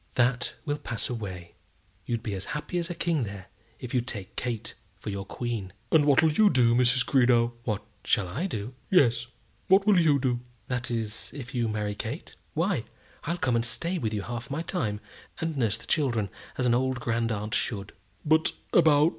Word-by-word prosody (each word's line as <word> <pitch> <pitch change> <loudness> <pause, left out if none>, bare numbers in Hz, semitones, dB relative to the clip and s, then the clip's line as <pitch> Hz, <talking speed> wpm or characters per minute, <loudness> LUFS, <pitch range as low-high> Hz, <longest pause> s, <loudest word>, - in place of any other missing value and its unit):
"That 125 0 +2
will 145 -1 -1
pass 115 0 -3
away. 95 -7 -6 0.5
You'd 115 -1 -1
be 110 -4 -3
as 95 -1 -4
happy 175 +4 -3
as 170 0 -2
a 175 - -3
king 165 -4 +1
there, 100 -4 -5 0.3
if 125 - -7
you'd 125 -1 +1
take 100 -6 -6
Kate 120 -4 -3 0.2
for 105 +2 -5
your 100 0 -4
queen." 115 -7 -4 0.2
"And 155 -3 +5
what'll 150 +2 +5
you 210 +7 +5
do, 120 -7 +4
Mrs. 125 +1 +4
Greenow?" 120 -3 +4
"What 105 -1 -2 0.2
shall 105 -2 +2
I 135 - -2
do?" 110 - -4 0.2
"Yes; 120 -9 +4 0.4
what 195 +1 +5
will 205 -4 +6
you 155 -4 +5
do?" 125 -3 0 0.3
"That 125 0 -1
is, 115 -2 -3
if 135 -3 -7
you 120 -2 +1
marry 105 -1 -1
Kate? 115 +8 -5 0.2
Why, 165 - +1 0.4
I'll 170 +3 -1
come 130 -7 +1
and 115 - +2
stay 170 +9 0
with 110 -6 -1
you 105 -2 -2
half 120 +3 -5
my 150 +4 -2
time, 110 - -2 0.4
and 165 -1 -2
nurse 115 -6 +1
the - - -12
children, 120 - +1 0.3
as 125 - 0
an 120 - +4
old 130 +1 +1
grand 115 -1 0
aunt 105 0 -3
should." 100 -3 -2 0.3
"But 160 +1 +4 0.2
about 155 -2 +6
120 Hz, 195 wpm, -28 LUFS, 110-150 Hz, 0.5 s, will